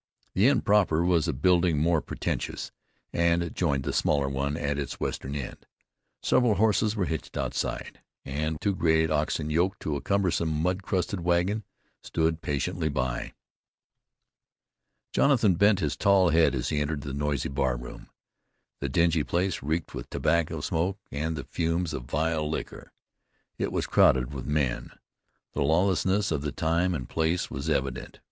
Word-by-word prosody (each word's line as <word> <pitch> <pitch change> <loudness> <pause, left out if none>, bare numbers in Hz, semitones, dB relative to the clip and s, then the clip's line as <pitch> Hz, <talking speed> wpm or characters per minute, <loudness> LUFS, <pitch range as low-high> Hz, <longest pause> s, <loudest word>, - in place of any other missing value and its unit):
The 100 +6 +4
inn 140 - +3
proper 95 -6 +3
was 85 -2 +2
a - - +2
building 85 +3 +3
more 80 +1 +2
pretentious, - - -4 0.4
and 85 0 +1
joined 70 -6 0
the 70 -1 -2
smaller 70 -2 +2
one 70 +2 -2
at 70 -2 -1
its 70 - -5
western 70 +2 -3
end. 70 -4 -6 0.6
Several 125 -4 +3
horses 110 0 +2
were 100 -4 0
hitched 75 -4 -4
outside, - - -3 0.2
and 75 +3 -2
two 100 - 0
great 80 -2 +2
oxen 75 0 0
yoked 90 +5 +1
to 75 - -2
a 70 - -3
cumbersome 90 -5 +1
mud 90 +5 0
crusted 95 0 -1
wagon 90 +5 +1 0.4
stood 80 0 -1
patiently 75 +3 -1
by. 65 -4 -2 1.8
Jonathan 120 -9 +4
bent 100 +2 +3
his 75 -3 0
tall 95 -2 +4
head 80 -2 +4
as 60 - -2
he 75 - 0
entered 75 0 -2
the 70 -1 -6
noisy 75 0 -1
bar 65 -3 0
room. - - -10 0.7
The 70 - -2
dingy 85 +2 +2
place 90 +3 -1
reeked 80 +4 -2
with - - -7
tobacco 85 0 0
smoke 90 +4 -1
and 80 +3 -2
the 70 - -5
fumes 85 +1 -1
of 65 -4 -5
vile 75 +2 -1
liquor. 80 - -5 0.7
It - - -1
was - - -1
crowded 65 0 +3
with 65 - -6
men. 75 -4 -1 0.6
The - - -2
lawlessness 95 +5 +2
of 75 -3 0
the 75 0 -3
time 85 +4 +1
and 65 -5 -5
place 80 +2 0
was 70 +1 -4
evident. 65 -2 -2
80 Hz, 160 wpm, -27 LUFS, 70-90 Hz, 1.8 s, The